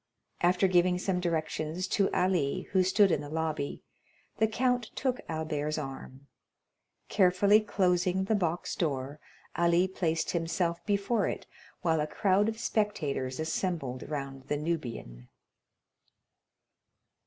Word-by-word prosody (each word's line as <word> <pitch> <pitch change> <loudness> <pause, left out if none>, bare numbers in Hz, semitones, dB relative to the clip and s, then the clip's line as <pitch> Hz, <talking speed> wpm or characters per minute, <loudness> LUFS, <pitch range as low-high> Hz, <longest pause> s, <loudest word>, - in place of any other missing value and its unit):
After 180 +2 +4
giving 180 0 +3
some 180 0 -1
directions 165 0 -2
to 200 -2 +2
Ali, 180 -7 +1
who 190 - +4
stood 190 +1 +4
in 150 - +1
the 145 - -7
lobby, 155 -2 -3 0.5
the 220 - +3
count 245 +1 0
took 255 -2 -1
Albert's 155 -1 -2
arm. 135 -1 -7 0.8
Carefully 200 +2 +4
closing 185 -3 +1
the 200 - 0
box 175 -4 -1
door, 140 -3 -2 0.4
Ali 170 +1 +3
placed 165 -4 -1
himself 170 0 -1
before 205 +1 +1
it, - - -4 0.4
while 160 -2 +2
a 150 - -1
crowd 200 +5 +2
of 220 - -5
spectators 155 - -1
assembled 160 -5 -2
round 135 -3 -5
the 145 - 0
Nubian. 120 - -4
175 Hz, 120 wpm, -30 LUFS, 150-190 Hz, 0.8 s, After